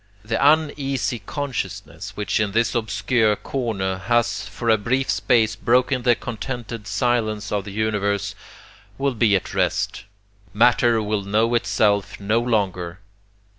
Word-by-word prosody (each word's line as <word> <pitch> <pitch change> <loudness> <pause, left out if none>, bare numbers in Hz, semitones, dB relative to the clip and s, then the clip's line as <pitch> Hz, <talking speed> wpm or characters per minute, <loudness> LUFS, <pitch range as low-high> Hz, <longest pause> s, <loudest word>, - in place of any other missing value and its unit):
The 110 +4 0
uneasy, 140 -7 +2
consciousness 110 - -5
which 105 +2 0
in 105 -2 0
this 115 +1 +2
obscure 110 -1 +1
corner 100 -8 -2
has 110 -2 0
for 115 +2 -6
a 110 -1 +5
brief 130 +6 0
space 115 -4 +2
broken 125 +2 +2
the 120 -1 +4
contented 115 -2 -6
silence 110 0 0
of 100 -2 -1
the 100 - -7
universe, 100 -1 -1 0.6
will 140 -1 0
be 110 -3 +3
at 95 - -2
rest. - - -1 0.5
Matter 115 0 +4
will 105 0 -1
know 110 +4 +1
itself 105 -4 +1
no 105 +3 +1
longer. 95 -7 -1
110 Hz, 130 wpm, -22 LUFS, 105-120 Hz, 0.6 s, a